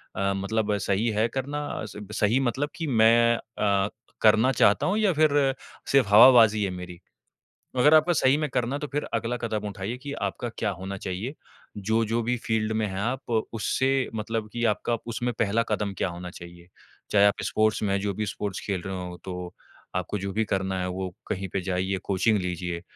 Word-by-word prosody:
अ, 100 Hz, 0 st, 0 dB
मतलब 105 Hz, +1 st, 0 dB
सही 100 Hz, +3 st, 0 dB
है 110 Hz, +2 st, +3 dB
करना, 145 Hz, +2 st, -3 dB
स -, -, -10 dB, 0.2 s
सही 110 Hz, +5 st, +3 dB
मतलब 135 Hz, +3 st, -1 dB
कि 165 Hz, -3 st, -4 dB
मैं 115 Hz, -1 st, +5 dB
अ, 100 Hz, -3 st, 0 dB, 0.3 s
करना 110 Hz, +4 st, +5 dB
चाहता 105 Hz, -4 st, +3 dB
हूँ 200 Hz, +4 st, +1 dB
या 210 Hz, -4 st, +3 dB
फिर 155 Hz, -1 st, +3 dB, 0.6 s
सिर्फ़ 135 Hz, -6 st, +4 dB
हवाबाज़ी 110 Hz, -1 st, +7 dB
है 100 Hz, -, 0 dB
मेरी। 90 Hz, -1 st, -8 dB, 0.8 s
अगर 150 Hz, +5 st, +5 dB
आपको 155 Hz, +3 st, +5 dB
सही 140 Hz, -2 st, +3 dB
में 150 Hz, -2 st, -1 dB
करना, 125 Hz, +2 st, -1 dB
तो 150 Hz, 0 st, -5 dB
फिर 145 Hz, +2 st, -2 dB
अगला 115 Hz, +2 st, -1 dB
कदम 110 Hz, -3 st, -3 dB
उठाइए 100 Hz, +5 st, -5 dB
कि 140 Hz, +2 st, -7 dB
आपका 105 Hz, +1 st, -3 dB
क्या 105 Hz, -, 0 dB
होना 95 Hz, +1 st, -6 dB
चाहिए। 95 Hz, +9 st, -4 dB, 0.4 s
जो-जो 110 Hz, +3 st, 0 dB
भी 125 Hz, +2 st, 0 dB
फील्ड 110 Hz, -1 st, 0 dB
में 110 Hz, 0 st, 0 dB
हैं 95 Hz, 0 st, -4 dB
आप, 125 Hz, +5 st, -3 dB, 0.2 s
उससे 130 Hz, +4 st, 0 dB
मतलब 110 Hz, 0 st, -3 dB
कि 120 Hz, -, -3 dB
आपका 115 Hz, +2 st, +1 dB
उसमें 120 Hz, +1 st, -2 dB
पहला 115 Hz, +1 st, +2 dB
कदम 105 Hz, -2 st, -1 dB
क्या 95 Hz, -, 0 dB
होना 90 Hz, +1 st, -7 dB
चाहिए। 85 Hz, -1 st, -12 dB, 0.4 s
चाहे 100 Hz, -1 st, +5 dB
आप 100 Hz, -, +2 dB
स्पोर्ट्स 110 Hz, 0 st, +1 dB
में 100 Hz, -, 0 dB
हैं 100 Hz, -, +1 dB
जो 100 Hz, 0 st, -1 dB
भी 105 Hz, +3 st, -2 dB
स्पोर्ट्स 100 Hz, -1 st, -4 dB
खेल 95 Hz, -3 st, -2 dB
रहे 95 Hz, +1 st, -5 dB
हों, 90 Hz, -1 st, -6 dB
तो 90 Hz, -1 st, -6 dB, 0.4 s
आपको 90 Hz, +3 st, -2 dB
जो 100 Hz, 0 st, -4 dB
भी 110 Hz, +1 st, +1 dB
करना 95 Hz, -1 st, -1 dB
है, 90 Hz, -, -2 dB
वो 95 Hz, 0 st, -4 dB
कहीं 95 Hz, +1 st, -3 dB
पे 95 Hz, -, 0 dB
जाइए, 95 Hz, +1 st, -1 dB
कोचिंग 100 Hz, +3 st, +2 dB
लीजिए। 90 Hz, -1 st, -3 dB
110 Hz, 195 wpm, -26 LUFS, 95-120 Hz, 0.8 s, हवाबाज़ी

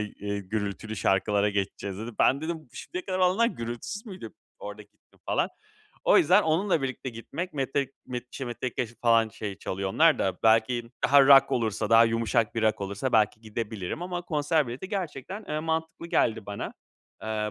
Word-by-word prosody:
eee, 100 Hz, -1 st, -4 dB
gürültülü 105 Hz, +2 st, -4 dB
şarkılara 100 Hz, +3 st, +2 dB
geçeceğiz." 100 Hz, -1 st, -3 dB
dedi. 115 Hz, +3 st, -5 dB
Ben 135 Hz, -, +4 dB
dedim: 160 Hz, -2 st, -5 dB
"Şimdiye 355 Hz, -, -6 dB
kadar 185 Hz, -, -2 dB
olanlar 185 Hz, +5 st, +4 dB
gürültüsüz 120 Hz, -, -5 dB
müydü?" 190 Hz, -3 st, -8 dB, 0.3 s
Orada -, -, -8 dB
gittim -, -, -29 dB
falan. -, -, +1 dB, 0.6 s
O -, -, +6 dB
yüzden 210 Hz, -, +5 dB
onunla 165 Hz, 0 st, +1 dB
birlikte 130 Hz, 0 st, -3 dB
gitmek 165 Hz, +10 st, -6 dB
Metek 135 Hz, -1 st, -1 dB
m 125 Hz, -1 st, -4 dB
şey, 135 Hz, -, -6 dB
Metellica 120 Hz, +1 st, -3 dB
ş 115 Hz, -, -16 dB
falan 115 Hz, -1 st, +4 dB
şey 105 Hz, -2 st, -6 dB
çalıyor 95 Hz, +1 st, -3 dB
onlar 160 Hz, 0 st, +5 dB
da. 95 Hz, -2 st, -1 dB
Belki 115 Hz, +1 st, +3 dB
daha 140 Hz, 0 st, +7 dB
rock 135 Hz, -1 st, +7 dB
olursa, 110 Hz, -3 st, -1 dB
daha 115 Hz, 0 st, +8 dB
yumuşak 115 Hz, 0 st, +1 dB
bir 115 Hz, -, -1 dB
rock 110 Hz, -1 st, +2 dB
olursa 100 Hz, +6 st, -3 dB
belki 110 Hz, -1 st, +3 dB
gidebilirim 110 Hz, -, -5 dB
ama 180 Hz, -1 st, -4 dB
konser 155 Hz, -2 st, +1 dB
bileti 125 Hz, +10 st, -6 dB
gerçekten, 190 Hz, -, -5 dB
eee, 150 Hz, 0 st, -1 dB
mantıklı 160 Hz, +1 st, -3 dB
geldi 115 Hz, -9 st, +1 dB
bana, 100 Hz, 0 st, -5 dB, 0.5 s
eee, 110 Hz, -1 st, -2 dB
120 Hz, 170 wpm, -27 LUFS, 110-160 Hz, 0.6 s, daha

